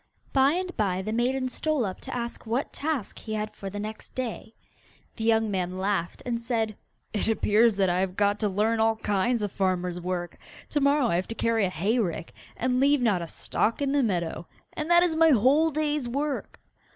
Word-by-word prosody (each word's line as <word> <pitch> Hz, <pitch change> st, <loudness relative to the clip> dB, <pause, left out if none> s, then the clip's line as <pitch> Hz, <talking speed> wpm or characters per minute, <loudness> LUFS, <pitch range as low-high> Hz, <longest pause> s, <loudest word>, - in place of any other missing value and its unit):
By 270 Hz, +2 st, +5 dB
and 365 Hz, +1 st, -3 dB
by 190 Hz, -3 st, 0 dB
the 215 Hz, +2 st, -3 dB
maiden 255 Hz, +3 st, +1 dB
stole 295 Hz, 0 st, 0 dB
up 190 Hz, -2 st, -5 dB
to -, -, -6 dB
ask 235 Hz, -1 st, -5 dB
what 240 Hz, +5 st, -1 dB
task 295 Hz, -7 st, -3 dB
he 220 Hz, -1 st, -5 dB
had 215 Hz, 0 st, -3 dB
for 195 Hz, -, -7 dB
the 205 Hz, +1 st, -6 dB
next 215 Hz, +1 st, -7 dB
day. 235 Hz, -3 st, -5 dB, 0.6 s
The 220 Hz, -, -4 dB
young 225 Hz, -1 st, +3 dB
man 185 Hz, -1 st, -2 dB
laughed, 190 Hz, -3 st, -2 dB
and 235 Hz, -2 st, -2 dB
said: 225 Hz, -3 st, -1 dB, 0.4 s
'It 210 Hz, -, -1 dB
appears 220 Hz, 0 st, +3 dB
that 195 Hz, -1 st, +2 dB
I 180 Hz, 0 st, +1 dB
have 185 Hz, -1 st, -1 dB
got 205 Hz, 0 st, +2 dB
to 210 Hz, -, +1 dB
learn 215 Hz, +4 st, +1 dB
all 225 Hz, 0 st, +3 dB
kinds 215 Hz, +2 st, 0 dB
of 205 Hz, -, -2 dB
farmer's 180 Hz, -2 st, -1 dB
work. 175 Hz, -1 st, -4 dB, 0.3 s
To 295 Hz, -, +1 dB
morrow 280 Hz, -3 st, +3 dB
I 170 Hz, -, +2 dB
have 185 Hz, -, -2 dB
to 225 Hz, -, -4 dB
carry 225 Hz, -4 st, +1 dB
a -, -, -3 dB
hay 200 Hz, +8 st, 0 dB
rick, 170 Hz, -6 st, -2 dB, 0.2 s
and 250 Hz, +1 st, +1 dB
leave 285 Hz, +2 st, +4 dB
not 205 Hz, -7 st, +2 dB
a 170 Hz, -, -5 dB
stalk 220 Hz, +7 st, -1 dB
in 280 Hz, -1 st, 0 dB
the 285 Hz, 0 st, +3 dB
meadow, 175 Hz, -7 st, -1 dB, 0.3 s
and 305 Hz, +2 st, -3 dB
that 345 Hz, 0 st, +6 dB
is 340 Hz, -3 st, +1 dB
my 325 Hz, 0 st, +5 dB
whole 280 Hz, +5 st, +4 dB
day's 300 Hz, -4 st, -1 dB
work! 280 Hz, +3 st, -3 dB
225 Hz, 210 wpm, -27 LUFS, 195-265 Hz, 0.6 s, that